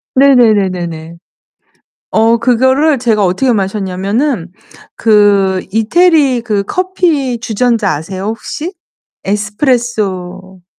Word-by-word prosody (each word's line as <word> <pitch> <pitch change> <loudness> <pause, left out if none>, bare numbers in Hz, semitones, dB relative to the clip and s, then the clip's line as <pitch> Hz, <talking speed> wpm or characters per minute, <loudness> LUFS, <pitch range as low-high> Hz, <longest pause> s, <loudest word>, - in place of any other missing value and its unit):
네네네네네. 190 - +2 0.9
어 225 +1 +3
그거를 260 +5 +2
제가 220 -4 +1
어떻게 235 +8 +1
마셨냐면은 195 - -2 0.4
그 200 -4 +3
이태리 275 - +2
그 210 -4 -1
커피 325 - -1
주전자 225 -2 0
아세요 185 +6 -6
혹시? 270 - -5 0.5
에스프레소 205 -4 -2
220 Hz, 215 characters per minute, -13 LUFS, 190-255 Hz, 0.9 s, 어